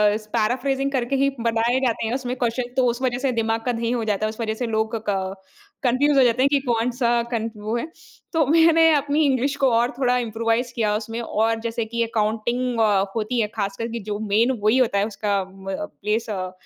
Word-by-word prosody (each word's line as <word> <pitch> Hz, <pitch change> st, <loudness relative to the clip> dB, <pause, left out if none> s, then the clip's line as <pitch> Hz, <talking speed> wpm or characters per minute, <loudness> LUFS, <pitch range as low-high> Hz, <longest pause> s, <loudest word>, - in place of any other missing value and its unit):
इस 215 Hz, -, -6 dB
पैराफ्रेजिंग 265 Hz, +5 st, 0 dB
करके 260 Hz, 0 st, -1 dB
ही 275 Hz, +1 st, +3 dB
बनाये 230 Hz, +2 st, +1 dB
जाते 230 Hz, -2 st, 0 dB
हैं 235 Hz, -, -2 dB
उसमें 255 Hz, -2 st, -3 dB
क्वेश्चन 245 Hz, 0 st, -2 dB
तो 260 Hz, -, +4 dB
उस 240 Hz, +1 st, -1 dB
वज़ह 250 Hz, -2 st, 0 dB
से 255 Hz, -, +1 dB
दिमाग 225 Hz, 0 st, -1 dB
का 245 Hz, -, +1 dB
दही 230 Hz, 0 st, -2 dB
हो 240 Hz, -2 st, -1 dB
जाता 215 Hz, -1 st, 0 dB
है -, -, 0 dB
उस 220 Hz, +2 st, -7 dB
वज़ह 220 Hz, -1 st, -1 dB
से -, -, -1 dB
लोग 220 Hz, +1 st, 0 dB
क 190 Hz, -1 st, -1 dB, 0.5 s
कन्फ्यूज 275 Hz, +3 st, +3 dB
हो 270 Hz, -, +7 dB
जाते 245 Hz, 0 st, +2 dB
हैं 280 Hz, -, +4 dB
कि 285 Hz, -1 st, +3 dB
कौन-सा 240 Hz, -1 st, 0 dB, 0.2 s
कन 230 Hz, -1 st, -1 dB
वो 215 Hz, +2 st, -3 dB
है? 235 Hz, -, -2 dB, 0.5 s
तो 320 Hz, -3 st, +3 dB
मैंने 325 Hz, +2 st, +5 dB
अपनी 290 Hz, +1 st, +1 dB
इंग्लिश 275 Hz, +1 st, +1 dB
को 270 Hz, -2 st, +3 dB
और 235 Hz, +2 st, +3 dB
थोड़ा 250 Hz, -2 st, +2 dB
इम्प्रोवाइज़ 230 Hz, +1 st, -1 dB
किया 215 Hz, -3 st, +1 dB
उसमें 225 Hz, +2 st, -4 dB
और 225 Hz, 0 st, 0 dB
जैसे 230 Hz, 0 st, -2 dB
कि 235 Hz, +1 st, -3 dB
अकाउंटिंग 230 Hz, +2 st, -1 dB
अ, 205 Hz, -3 st, +3 dB
होती 230 Hz, +2 st, -1 dB
है 210 Hz, -, +1 dB
ख़ासकर 200 Hz, +1 st, -2 dB
कि 235 Hz, -, -4 dB
जो 205 Hz, -1 st, -2 dB
मैं 215 Hz, +1 st, +2 dB, 0.2 s
वही 215 Hz, +5 st, +3 dB
होता 235 Hz, -6 st, +2 dB
है 200 Hz, -, +2 dB
उसका 205 Hz, -2 st, -1 dB
उम, 190 Hz, 0 st, -9 dB
म 190 Hz, -, -2 dB, 0.3 s
प्लेस 220 Hz, +2 st, -1 dB
अ, 185 Hz, -3 st, -3 dB
230 Hz, 225 wpm, -23 LUFS, 220-255 Hz, 0.5 s, हो